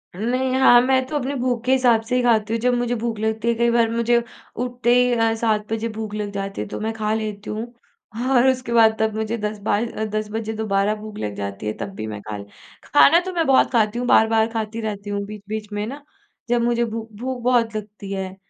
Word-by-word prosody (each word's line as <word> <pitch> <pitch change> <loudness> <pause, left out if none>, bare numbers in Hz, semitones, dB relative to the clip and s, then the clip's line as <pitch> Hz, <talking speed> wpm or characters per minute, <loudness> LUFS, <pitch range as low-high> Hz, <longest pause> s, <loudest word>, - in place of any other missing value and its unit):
नहीं। 255 +6 -1
हाँ, 245 -2 +7
मैं 260 0 +2
तो 300 - -5
अपनी 280 -1 -1
भूख 245 -2 -1
के 255 - +2
हिसाब 250 -4 +4
से 245 +2 -2
ही 250 - +3
खाती 225 -2 +2
हूँ 230 - 0
जब 250 +1 +2
मुझे 245 0 0
भूख 230 -2 -2
लगती 220 +1 -1
है, 235 - +4
कई 235 +1 +2
बार 235 -1 +3
मुझे 235 +1 +2 0.4
उठते 245 -1 +1
ही 250 0 +4
अ, 225 -1 +2
7 220 -2 -1
बजे 225 +1 -2
भूख 215 -2 -5
लग 210 -1 -3
जाती 195 0 -4
है - - -4
तो - - -6
मैं 220 +1 -2
खा 215 -1 -1
लेती 215 -2 -4
हूँ 220 +2 -3 0.7
और 245 +1 +5
उसके 255 -2 -1
बाद 225 -1 +5
तब 220 -1 0
मुझे 220 +1 -2
10 210 0 -4
बाय 205 +2 +1 0.3
10 215 0 -2
बजे 220 0 -3
दोबारा 210 -1 0
भूख 215 0 -9
लग 105 -1 -4
जाती 100 0 -5
है 105 - -1
तब - - -5
भी 110 - -5
मैं 105 -1 -6
खा 105 0 -6
ले 100 - -7 0.4
खाना 325 +3 +6
तो 375 - -4
मैं 335 -2 +1
बहुत 265 -1 +4
खाती 230 -1 +1
हूँ, 245 - -2
बार-बार 220 -1 +4
खाती 225 0 -3
रहती 205 -2 -5
हूँ, 200 0 -2
बीच-बीच 210 +1 -7
में 205 0 -2
ना 280 +3 -8 0.5
जब 240 -1 +2
मुझे 235 0 +1
भूख 225 0 -6
भूख 255 0 -4
बहुत 235 -3 +2
लगती 210 -1 -7
है 190 -1 -4
225 Hz, 235 wpm, -22 LUFS, 210-240 Hz, 0.7 s, हाँ